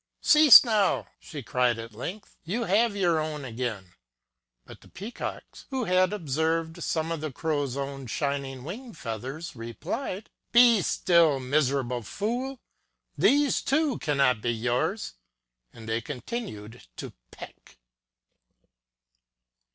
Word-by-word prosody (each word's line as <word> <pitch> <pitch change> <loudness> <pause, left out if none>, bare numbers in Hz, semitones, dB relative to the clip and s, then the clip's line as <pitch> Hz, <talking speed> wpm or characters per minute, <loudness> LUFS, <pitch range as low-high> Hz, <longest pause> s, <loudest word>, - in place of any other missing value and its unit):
Cease 300 -5 +9
now! 215 -5 +1
she 150 -5 -9
cried 125 -1 +1
at 115 0 -8
length; 175 - -7
you 205 +8 -2
have 215 +1 +2
your 175 -5 +2
own 155 -2 -4
again! 110 -7 -5 0.7
But - - -13
the - - -17
Peacocks, 210 +6 -8
who 265 -3 -2
had 185 -2 +2
observed 160 -1 -1
some 160 0 -1
of 165 -2 -3
the 155 -1 -4
Crow's 145 -2 -2
own 135 -1 -5
shining 140 -1 -3
wing 230 - -8
feathers, 135 +5 -6
replied: 180 - -5 0.2
Be 235 -3 +6
still, 170 -6 +3
miser 135 +1 +1
able 125 -1 -4
fool! 240 - -3 0.6
these, 290 0 +3
too, 300 0 +1
cannot 140 -7 +1
be 120 - -1
yours! 125 - -1 0.6
And 115 -1 -12
they 115 +1 -1
continued 125 - -7
to - - -8 0.2
peck. - - -13
155 Hz, 125 wpm, -27 LUFS, 125-205 Hz, 0.7 s, Cease